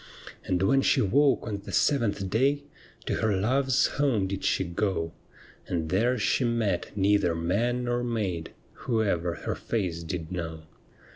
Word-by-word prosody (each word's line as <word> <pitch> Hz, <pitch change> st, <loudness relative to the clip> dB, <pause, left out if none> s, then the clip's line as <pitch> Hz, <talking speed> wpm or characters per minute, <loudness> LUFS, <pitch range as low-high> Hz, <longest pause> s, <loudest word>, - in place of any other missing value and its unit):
And 90 Hz, 0 st, 0 dB
when 135 Hz, +8 st, +4 dB
she -, -, +3 dB
woke 135 Hz, +7 st, +3 dB
on 105 Hz, -3 st, -3 dB
the -, -, -8 dB
seventh 115 Hz, -9 st, +1 dB
day, 135 Hz, +8 st, +1 dB, 0.4 s
To -, -, -1 dB
her 105 Hz, -3 st, +1 dB
love's 130 Hz, +5 st, +2 dB
home 130 Hz, -9 st, +1 dB
did 95 Hz, 0 st, -4 dB
she -, -, +1 dB
go, 85 Hz, -2 st, -2 dB, 0.5 s
And 80 Hz, -3 st, -2 dB
there 115 Hz, +8 st, +2 dB
she 120 Hz, +4 st, +1 dB
met 115 Hz, -6 st, 0 dB
neither 100 Hz, -3 st, +3 dB
man 110 Hz, +9 st, 0 dB
nor 120 Hz, 0 st, -1 dB
maid 100 Hz, -9 st, -2 dB, 0.4 s
Who 115 Hz, -2 st, +2 dB
ever 85 Hz, -4 st, 0 dB
her -, -, -3 dB
face 90 Hz, -7 st, -2 dB
did 80 Hz, 0 st, -5 dB
know. 80 Hz, -3 st, -5 dB
100 Hz, 155 wpm, -27 LUFS, 90-120 Hz, 0.5 s, when